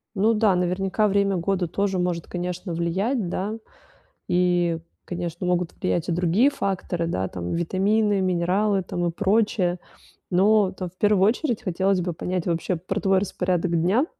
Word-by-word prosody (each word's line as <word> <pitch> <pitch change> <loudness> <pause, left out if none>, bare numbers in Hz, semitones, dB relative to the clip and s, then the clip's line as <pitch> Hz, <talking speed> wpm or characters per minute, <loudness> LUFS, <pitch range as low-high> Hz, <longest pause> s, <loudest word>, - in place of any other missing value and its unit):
Ну 215 +3 +3
да, 210 -3 +3
наверняка 190 +4 +1
время 200 -1 +2
года 180 0 -1
тоже 195 +2 -1
может, 175 -2 -1
конечно, 180 0 -4
влиять, 190 +6 -1
да. 200 +4 -2 0.7
И, 175 -2 +2 0.3
конечно, 175 0 -4
могут 180 -1 0
влиять 175 -1 -1
и - - +1
другие 180 +10 +3
факторы, 185 -8 -2
да, 95 - -1
там: 90 -1 -5
витамины, 200 +4 +1
минералы 190 +3 +1
там 175 -1 -3
и 170 - +1
прочее. 195 -2 +1 0.5
Но 200 +2 +4
там 185 -2 -6
в 185 - -31
первую 205 -2 +4
очередь 245 0 0
хотелось 190 0 +1
бы 175 -1 -2
понять 180 +1 -3
вообще 170 +1 -1
про 185 +4 -3
твой 195 -1 +3
распорядок 180 -2 -1
дня. 210 - +3
185 Hz, 155 wpm, -24 LUFS, 175-200 Hz, 0.7 s, Но